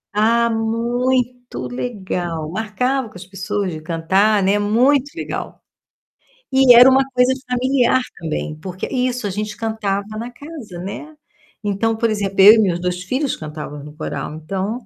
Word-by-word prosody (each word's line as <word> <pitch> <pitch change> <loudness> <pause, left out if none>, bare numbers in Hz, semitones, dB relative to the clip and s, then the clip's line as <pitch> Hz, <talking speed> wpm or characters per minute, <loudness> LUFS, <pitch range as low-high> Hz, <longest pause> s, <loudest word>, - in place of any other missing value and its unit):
Ah, 230 +2 +3
muito 245 +2 -1
legal! 185 -10 -4
Marcava 230 +5 -1
com 210 - -21
as 180 - -9
pessoas 195 +1 -3
de 155 - -7
cantar, 190 +6 +2
né, 200 +2 +2
muito 250 +7 +3
legal. 335 - -5 0.9
E 265 -1 +7
era 245 +2 +9
uma 265 0 +4
coisa 250 0 +3
de 265 - -7
familiar 255 0 +2 0.2
também, 155 -2 -3
porque 185 +2 -5
Isso 250 -2 -1
a - - 0
gente 210 +2 -4
cantava 210 -2 -2
na 235 +2 -5
casa, 250 - -10
né. 250 - -7 0.5
Então, 210 +2 0
por 230 +1 0
exemplo, 200 -2 0
eu 205 +3 +10
e - - +2
meus 180 -5 +1
2 180 0 -2
filhos 260 +9 -1
cantávamos 150 -2 -7
no 150 0 -11
coral, 150 -2 -5
então 195 +9 -4
215 Hz, 160 wpm, -19 LUFS, 190-250 Hz, 0.9 s, eu